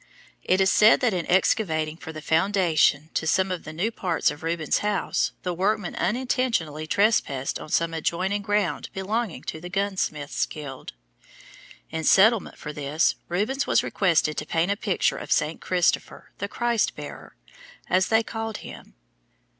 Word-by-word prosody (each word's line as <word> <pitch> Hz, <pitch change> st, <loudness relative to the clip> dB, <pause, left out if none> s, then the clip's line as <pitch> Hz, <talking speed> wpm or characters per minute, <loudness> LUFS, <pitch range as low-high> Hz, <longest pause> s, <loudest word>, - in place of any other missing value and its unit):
It 185 Hz, -, +2 dB
is 190 Hz, 0 st, +4 dB
said 215 Hz, +1 st, +6 dB
that 245 Hz, -5 st, +2 dB
in 175 Hz, -2 st, -3 dB
excavating 160 Hz, -4 st, +1 dB
for 160 Hz, -, -9 dB
the 155 Hz, -1 st, -9 dB
foundation 165 Hz, -4 st, +2 dB
to 160 Hz, -, -1 dB
some 190 Hz, +3 st, +2 dB
of 180 Hz, -, -4 dB
the 155 Hz, -, -6 dB
new 180 Hz, +9 st, -1 dB
parts 180 Hz, -8 st, 0 dB
of 150 Hz, -, -10 dB
Rubens' 165 Hz, -2 st, 0 dB
house, 205 Hz, -2 st, 0 dB
the 180 Hz, -, -1 dB
workmen 195 Hz, +1 st, 0 dB
unintentionally 230 Hz, -, -1 dB
trespassed 160 Hz, -, +1 dB
on -, -, -9 dB
some 165 Hz, +1 st, +1 dB
adjoining 185 Hz, +5 st, -1 dB
ground 205 Hz, -6 st, -1 dB
belonging 205 Hz, +1 st, -2 dB
to 160 Hz, -, -6 dB
the 180 Hz, -, -7 dB
gunsmiths' 190 Hz, -7 st, -1 dB
guild. 140 Hz, -4 st, -8 dB, 1.0 s
In 160 Hz, 0 st, -3 dB
settlement 215 Hz, +6 st, +4 dB
for 150 Hz, -, -7 dB
this 150 Hz, +2 st, +1 dB, 0.2 s
Rubens 215 Hz, +11 st, -1 dB
was -, -, +3 dB
requested 165 Hz, -5 st, +1 dB
to 150 Hz, -, -3 dB
paint 165 Hz, +4 st, +1 dB
a -, -, +1 dB
picture 200 Hz, -3 st, 0 dB
of -, -, -8 dB
St. 155 Hz, +2 st, +1 dB
Christopher, 180 Hz, -2 st, 0 dB
the 200 Hz, -, -2 dB
Christ 235 Hz, +1 st, 0 dB
Bearer, 145 Hz, -1 st, -9 dB, 0.5 s
as 185 Hz, +1 st, +2 dB
they 225 Hz, 0 st, +3 dB
called 225 Hz, -1 st, -5 dB
him. -, -, -11 dB
180 Hz, 160 wpm, -25 LUFS, 160-205 Hz, 1.0 s, said